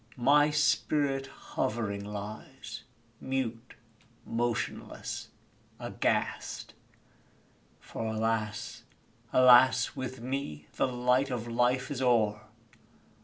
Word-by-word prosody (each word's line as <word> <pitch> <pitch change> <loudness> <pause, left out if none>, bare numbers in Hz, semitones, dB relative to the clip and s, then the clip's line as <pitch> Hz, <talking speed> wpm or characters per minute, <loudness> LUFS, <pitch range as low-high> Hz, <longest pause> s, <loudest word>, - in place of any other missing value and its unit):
my 145 +4 +5
spirit 145 -2 +1
hovering 110 -6 -3
lies 110 +3 -7 0.4
Mute, 125 -3 -3 0.5
motionless, 115 0 -3 0.5
aghast! - - -2 1.1
For, 115 - -6
alas! 115 +1 -2 0.5
alas! 125 0 +6
with 130 -1 -5
me 120 - -4
The 135 - +2
light 125 +2 +2
of 120 -2 -3
Life 125 +3 +1
is 135 -2 -3
o'er! 110 -4 +3
120 Hz, 80 wpm, -30 LUFS, 115-130 Hz, 1.1 s, alas